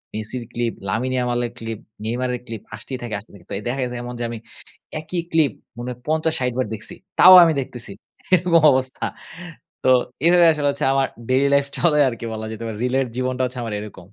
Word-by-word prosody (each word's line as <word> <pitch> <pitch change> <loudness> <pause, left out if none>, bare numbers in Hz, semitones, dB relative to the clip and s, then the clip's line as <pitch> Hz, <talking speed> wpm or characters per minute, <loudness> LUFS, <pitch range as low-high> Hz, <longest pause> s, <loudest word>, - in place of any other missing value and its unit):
মেসির 110 +3 -4
clip, 120 -1 -1 0.2
Lamine 120 +6 -1
ইয়ামালের 120 -1 0
clip, 115 -1 -5 0.3
নেইমারের 125 +2 -1
clip 115 -3 -6
আসতেই 120 +5 -6
থাকে, 115 - -5
আসতেই 105 - -19
থাকে। 90 -3 -16
তো - - -2 0.2
দেখা 135 +3 -2
গেছে 125 -1 -4
এমন 125 - -6
যে - - -2
আমি 115 - -5 0.6
একই 170 +3 -3
ক্লিপ 155 -6 +3 0.3
মনে 120 - -5
হয় 125 - -8
৫০-৬০ 155 -5 +1
বার 130 - +1
দেখছি। 110 - -7 0.3
তাও 185 +1 +11
আমি 165 - +3
দেখতেছি। 120 -5 -7 0.4
এরকম 170 -1 +4
অবস্থা। 130 0 -1 0.8
তো 130 - +5 0.4
এভাবে 175 0 +6
আসলে 150 -2 0
হচ্ছে - - -3
আমার 135 -1 +3 0.2
ডেইলি 135 +2 +3
লাইফ 140 0 +3
চলে 160 -3 +3
আরকি 115 -1 -5
বলা 110 0 -5
যেতে 110 +1 -7
পারে। 110 -2 -5
রিলের 130 +1 +1
জীবনটা 130 0 -1
হচ্ছে 125 0 -7
আমার 110 -2 -4
এরকম। 105 -1 -9
125 Hz, 195 wpm, -22 LUFS, 115-140 Hz, 0.8 s, তাও